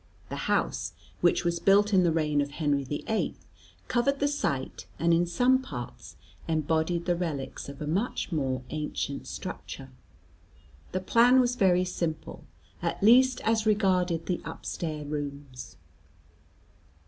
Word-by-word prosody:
The - - -4
house, - - 0 0.3
which 175 0 +2
was 170 0 +1
built 205 +3 +4
in 190 - +6
the 175 -2 +3
reign 150 -2 +1
of 140 - -2
Henry 145 -2 0
the 145 +3 -4
Eighth, 220 -1 -2 0.4
covered 275 +3 +1
the 285 - +2
site 140 - -2
and 170 +2 +3
in 175 +1 +3
some 255 +8 +3
parts 125 - -8 0.3
embodied 160 +2 0
the 175 - +2
relics 155 -7 -4
of 140 +2 -7
a - - -3
much 190 +8 -1
more 130 -5 -1
ancient 150 -2 -3
structure. - - -7 1.0
The 185 - -2
plan 240 +6 +5
was 245 -1 +3
very 185 -5 +3
simple, 170 -3 -4 0.4
at - - -2
least 250 +4 +6
as 220 0 +1
regarded 185 -5 +2
the 180 - -2
upstair 155 -3 -5
rooms. 140 -3 -6
170 Hz, 140 wpm, -28 LUFS, 150-210 Hz, 1.0 s, in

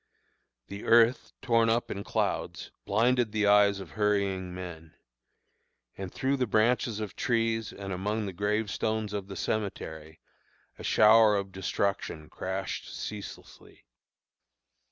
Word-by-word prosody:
The 100 +6 -8
earth, 115 +2 +4
torn 115 -2 +3
up 115 +1 0
in 100 - -4
clouds, - - -2
blinded 120 +2 +2
the 105 -1 +1
eyes 100 -1 +5
of 95 -4 -9
hurrying 100 -3 0
men; 85 -3 -8 1.0
and 95 -2 -6
through 135 +1 0
the 125 -2 0
branches 110 +1 +2
of 105 -2 -5
trees 115 -2 0
and 100 -1 -6
among 105 +4 -2
the 95 - -5
gravestones 105 +2 -1
of 100 -2 -4
the 100 - -8
cemetery 80 -6 -4 0.6
a - - -8
shower 110 0 +6
of 100 -1 -2
destruction 95 -4 -2
crashed 95 +2 -4
ceaselessly. 105 -1 -9
105 Hz, 125 wpm, -29 LUFS, 95-110 Hz, 1.0 s, shower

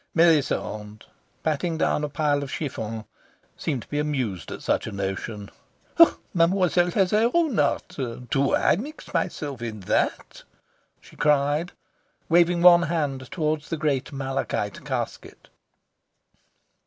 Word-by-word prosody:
Melisande, 135 -10 +1 0.4
patting 160 +2 -1
down 150 - +1
a 150 - -1
pile 145 -1 +1
of 140 - -5
chiffon, 110 -7 -4 0.5
seemed 135 -7 -3
to - - -20
be 145 - -2
amused 130 - -2
at - - -7
such - - 0
a - - -5
notion. 100 +1 -4 0.8
"Mademoiselle 175 0 +3
has 185 +1 +1
her 220 +3 +3
own 320 - +2
art. 145 - 0 0.3
Do 135 0 +2
I - - +3
mix 290 - -8
myself 140 -5 -2
in 110 -3 -5
that?" 90 - -1 0.6
she - - -17
cried, 150 +3 +1 0.6
waving 170 +1 +4
one 175 -1 +9
hand 150 -6 -2
towards 155 -4 -2
the 165 - -2
great 145 -4 -1
malachite 135 -6 -3
casket. - - -5
150 Hz, 130 wpm, -25 LUFS, 130-170 Hz, 0.8 s, one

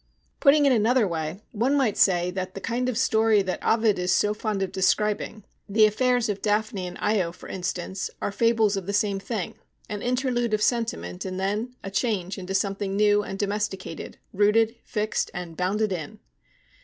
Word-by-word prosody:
"Putting 290 0 +5
it 275 - +5
in 250 - +4
another 225 +1 +3
way, 165 +3 -4
one 245 +7 +1
might 245 -7 +2
say 180 -2 +3
that 185 0 -5
the - - -4
kind 245 +4 -1
of 240 - -2
story 220 -4 +3
that 185 -1 -4
Ovid 220 -3 +3
is 180 0 0
so 205 +2 +3
fond 210 -2 -2
of 190 - -3
describing, 210 +2 0 0.3
the 215 +2 +5
affairs 245 +3 +2
of 205 -2 -3
Daphne 210 -3 0
and 180 - -8
Io, 195 -6 +1
for - - -13
instance, 185 +1 -3
are - - -2
fables 225 -1 +2
of 195 -2 -4
the 200 - -2
same 200 -1 +1
thing: 200 -2 -4 0.3
an 210 -1 -4
interlude 245 -2 0
of 210 - -4
sentiment 90 - -1
and 185 0 -4
then 210 +6 -2
a 195 - -6
change 195 -3 -1
into 190 +1 -4
something 195 0 -1
new 205 0 +4
and 195 -1 -6
domesticated, 200 -4 -3 0.2
rooted, 215 +3 +3
fixed, 215 -2 -1
and 175 -2 -6
bounded 195 +4 0
in." 160 -5 -6
205 Hz, 185 wpm, -25 LUFS, 190-225 Hz, 0.3 s, Putting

